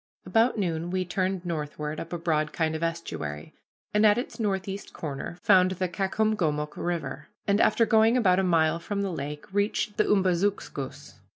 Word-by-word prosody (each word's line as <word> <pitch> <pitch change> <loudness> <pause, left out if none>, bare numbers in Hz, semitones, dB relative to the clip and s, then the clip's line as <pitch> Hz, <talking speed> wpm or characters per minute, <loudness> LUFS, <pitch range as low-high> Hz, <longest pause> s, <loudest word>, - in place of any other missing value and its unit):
About 225 +6 +3
noon 170 -4 -1
we 185 0 -1
turned 185 0 -1
northward 150 -2 -4
up 165 - -7
a 175 - -2
broad 155 -2 0
kind 160 -1 0
of 160 - -4
estuary, 165 - -4 0.4
and 210 +1 +3
at 210 0 +6
its 245 - -4
northeast 195 -2 -2
corner 150 +2 -5
found 185 0 +6
the 185 0 -1
Caucomgomoc 185 -5 0
River, 170 -3 -3 0.2
and 200 +1 +3
after 230 +2 +4
going 225 +2 +4
about 190 -6 +4
a - - +2
mile 165 -2 +3
from 200 +3 -3
the 195 - -2
lake 150 -2 -5
reached 205 +1 0
the 215 - +3
Umbazookskus. 180 - -1
180 Hz, 170 wpm, -27 LUFS, 160-200 Hz, 0.4 s, at